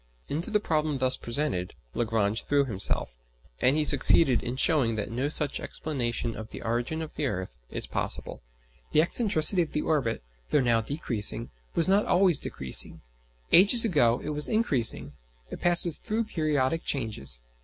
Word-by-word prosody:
Into 160 +8 -3
the 210 -1 +1
problem 155 -6 -1
thus 130 0 +1
presented 120 -8 -3 0.2
Lagrange 110 -2 -1
threw 145 -1 +2
himself, 100 - 0 0.5
and 130 +4 +2
he 155 - +1
succeeded 135 -3 +4
in 120 - -5
showing 130 -5 +1
that 105 +1 -4
no 130 +5 -2
such 150 -2 -2
explanation 120 -6 -4
of 110 0 -8
the - - -9
origin 120 +8 -2
of 155 - -9
the 145 - -2
earth 90 - -6
is - - -5
possible. - - -3 0.5
The 155 - +5
excentricity 185 -3 +2
of 165 - -4
the 150 - -1
orbit, 135 - -1 0.3
though 150 - +2
now 120 -3 +2
decreasing, 115 -4 -1 0.2
was 165 - +5
not 200 +2 +2
always 180 -4 +3
decreasing; 65 -1 0 0.5
ages 205 +6 +6
ago 125 - +2
it - - -5
was 150 0 0
increasing: 120 - +1 0.4
it - - -8
passes 175 -2 +6
through 225 0 -2
periodic 155 -5 -1
changes. 105 - -3
140 Hz, 160 wpm, -27 LUFS, 115-160 Hz, 0.5 s, ages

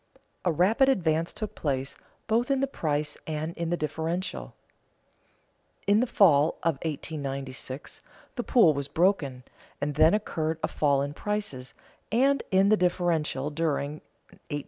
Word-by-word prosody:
A 180 - +2
rapid 210 - +3
advance 165 -8 +1
took 215 - -5
place, 140 -1 -2 0.3
both 230 +3 +1
in 275 -1 +2
the 275 - +2
price 150 - -2
and 155 +1 -3
in 170 -1 -3
the 175 - 0
differential. 160 +4 -3 1.3
In 205 +1 +4
the 250 - +1
fall 160 -8 +4
of 165 -4 +1
1896 140 -4 -5 0.3
the 245 - -1
pool 230 -10 +5
was 140 -1 -3
broken 145 -6 +1 0.4
and 145 +1 -2
then 160 +5 +5
occurred 160 -6 -2
a - - +2
fall 140 -2 +1
in 145 +1 -4
prices 185 -10 -3 0.4
and 270 +5 +3
in 190 +1 +4
the 215 - +5
differential 165 -6 0
during 150 -1 -2
1896 - - -26
97. 145 - -2
160 Hz, 145 wpm, -27 LUFS, 145-195 Hz, 1.3 s, pool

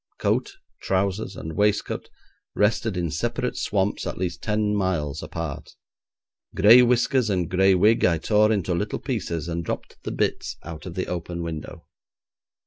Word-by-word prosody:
Coat, - - 0 0.3
trousers, 95 +1 -1
and 80 -1 -6
waistcoat 105 0 0 0.5
rested 105 -1 +1
in 85 -3 -1
separate 120 - -2
swamps 100 -1 -1
at - - -4
least 90 -2 -3
ten 105 -1 0
miles 80 -7 -1
apart. 80 -2 -6 0.8
Gray 115 +5 +8
whiskers 125 0 +2
and 90 -4 0
gray 95 +2 +4
wig 105 +5 +4
I 85 -2 +4
tore 105 +6 +3
into 95 -4 0
little 105 +5 -2
pieces, 90 - -3
and 85 0 -3
dropped - - -5
the - - -5
bits - - -2
out 80 +1 -8
of 90 - -7
the 95 - -1
open 85 -1 -4
window. 80 -3 -7
95 Hz, 150 wpm, -24 LUFS, 85-105 Hz, 0.8 s, Gray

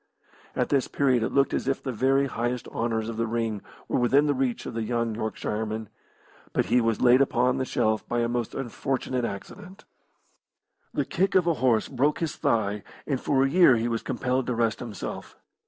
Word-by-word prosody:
At - - 0
this 140 -3 +2
period 130 -4 +2
it 115 - -1
looked 140 0 +2
as - - -1
if 135 - -1
the 130 - -2
very 135 +4 +2
highest 120 -1 -3
honours 115 -1 -1
of 115 -1 -5
the 115 0 0
ring 110 -2 -2 0.3
were - - 0
within 135 +4 +4
the 145 - +2
reach 130 -3 -1
of - - -5
the 115 - -2
young 115 0 -1
Yorkshireman, 110 -1 -3 0.6
but - - +1
he 120 +6 +3
was 115 -1 0
laid 125 +1 +6
upon 125 -1 +2
the 130 - -1
shelf 110 -3 0
by 120 0 +1
a 115 - +1
most 120 -1 -2
unfortunate 130 0 -2
accident. 185 - -8 1.1
The - - -1
kick 190 +1 0
of 185 -2 +5
a 170 - +3
horse 125 -7 +2
broke 140 +3 +1
his 165 -3 -2
thigh, 105 -2 0 0.2
and 135 -4 -1
for 135 -2 +2
a - - +3
year 155 -3 +6
he 115 +1 0
was 115 -1 -1
compelled 130 0 -1
to 125 - -1
rest 115 -1 0
himself. 115 -5 -7
120 Hz, 200 wpm, -26 LUFS, 115-135 Hz, 1.1 s, laid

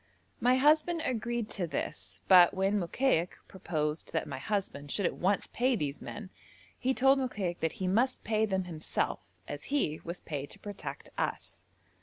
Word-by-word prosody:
My 250 +2 +4
husband 310 +5 +4
agreed 240 -2 -1
to 180 -4 -2
this, 95 - -4
but 180 -1 +8
when 195 +2 +2
Mokaik 180 -1 +1
proposed 155 -4 -3
that 160 - 0
my 135 -3 -5
husband 145 -5 -3
should 200 +6 0
at - - +1
once 195 +2 +1
pay 255 +1 +2
these 145 -7 -3
men, 200 -3 -7 0.5
he 260 +1 +1
told 270 +1 +5
Mokaik 200 -9 -2
that 160 0 0
he 190 - -3
must 240 +7 +2
pay 220 0 +1
them 190 -2 0
himself, 165 -3 -1 0.3
as - - -6
he 265 - 0
was 170 +1 -5
paid 145 -2 -5
to - - -8
protect 175 -9 -7
us. 85 0 -3
190 Hz, 170 wpm, -31 LUFS, 160-240 Hz, 0.5 s, but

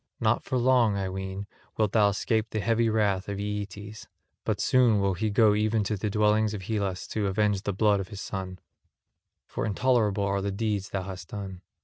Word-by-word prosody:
Not - - +1
for 130 - -1
long, 120 -4 +3
I 95 -1 -2
ween, 95 +1 -5 0.3
wilt 110 -2 +2
thou 105 -2 +4
escape 110 +2 0
the 110 - -2
heavy 115 +2 +2
wrath 105 -3 +1
of 100 - -3
Aeetes; 105 +1 -5 0.4
but - - -1
soon 120 -5 +4
will 100 -1 +1
he 105 +5 -1
go 105 0 +4
even 110 +1 +1
to 105 +2 -1
the 105 +2 -2
dwellings 105 +1 +2
of 95 - -7
Hellas 100 -3 -2
to 105 -2 -1
avenge 100 0 +1
the 100 - -2
blood 100 +1 +2
of 95 - -4
his 100 -3 -8
son, 95 -2 -5 0.9
for - - -4
intolerable 105 -2 +1
are 100 0 0
the 100 - -2
deeds 105 -1 -2
thou 95 -2 -3
hast 90 -2 -7
done. 95 -2 -7
105 Hz, 200 wpm, -27 LUFS, 100-110 Hz, 0.9 s, thou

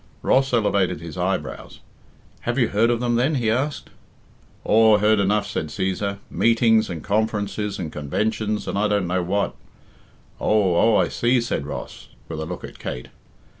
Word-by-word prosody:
Ross 135 +1 +3
elevated 100 -8 +1
his 85 -2 -8
eyebrows. 90 -6 -3 0.6
"Have 120 +2 -3
you 120 -4 +2
heard 110 +3 +2
of 120 -1 +1
them 120 -1 +1
then?" 135 +6 +2
he 115 -4 +1
asked. 140 +5 -2 0.7
"Aw, 110 -1 +5
heard 105 +1 +3
enough," 100 +1 +2
said 80 - -3
Cæsar, 95 +4 -2
"meetings, 115 -2 +3
and 85 -4 -5
conferences, 105 -1 -1
and 80 -4 -5
conventions, 105 +8 -2
and 100 - -1
I 105 - +2
don't 105 -2 +1
know 90 +1 0
what." 100 +3 -1 0.9
"Oh, 100 -5 +2
oh, 110 +4 +4
I - - +3
see," 120 +1 +1
said 115 -11 -2
Ross, - - -7 0.2
with 80 -2 -6
a 80 - -3
look 90 +1 -6
at - - -10
Kate. 60 - -6
105 Hz, 170 wpm, -23 LUFS, 95-115 Hz, 0.9 s, Aw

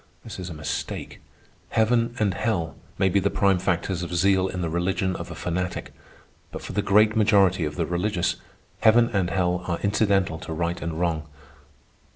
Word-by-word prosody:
This - - -8
is 90 -1 -5
a 80 - -7
mistake. 75 0 -5 0.5
Heaven 115 +1 +2
and 105 -4 +1
hell 95 -8 -1 0.2
may 95 - +3
be 100 +2 +3
the 100 +1 +1
prime 100 -3 +2
factors 90 0 -1
of 90 0 -4
zeal 95 +1 +3
in 90 -1 -4
the 85 - -1
religion 95 +2 0
of 85 0 -6
a 85 - -7
fanatic; 90 +5 -3 0.6
but - - -7
for - - -7
the 105 - +1
great 105 +3 +4
majority 100 -5 +4
of 75 0 -4
the 85 - 0
religious, 90 +2 -1 0.4
heaven 115 +2 +5
and 95 -3 +1
hell 90 -1 0
are 85 -1 0
incidental 100 -5 +1
to 80 - -6
right 85 +2 -2
and 85 -1 -4
wrong. 80 -3 -1
90 Hz, 185 wpm, -25 LUFS, 85-100 Hz, 0.6 s, heaven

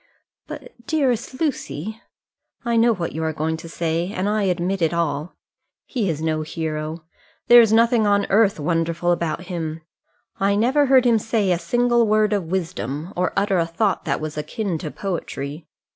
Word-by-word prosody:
"But, - - -9 0.2
dearest 260 -5 0
Lucy 220 - -3 0.3
" - - -44
"I 235 0 +1
know 230 +1 +5
what 180 -6 -2
you 160 - -4
are 160 - 0
going 155 +1 -1
to 165 +1 -10
say, 165 +2 -2
and 190 -1 -2
I 210 +1 +1
admit 180 +1 -1
it 165 0 +1
all. 155 -1 -2 0.5
He 225 -8 -1
is 155 -1 -3
no 155 -1 0
hero. 155 0 -4 0.4
There 240 0 +9
is 225 -2 +3
nothing 230 -1 +4
on 200 0 +3
earth 200 -3 +3
wonderful 165 +2 0
about 170 -1 -1
him. 165 -3 -5 0.6
I 200 +1 +2
never 260 +7 +3
heard 260 -1 +5
him 230 -2 +4
say 215 -3 0
a 175 - +1
single 240 +5 +2
word 215 0 +3
of 200 -4 0
wisdom, 160 - -3
or 180 +1 0
utter 195 -2 +2
a 165 - +1
thought 195 +4 0
that 140 -4 0
was 155 -1 -4
akin 190 +1 -3
to 155 - -5
poetry. 155 -4 -5
180 Hz, 180 wpm, -22 LUFS, 160-220 Hz, 0.6 s, There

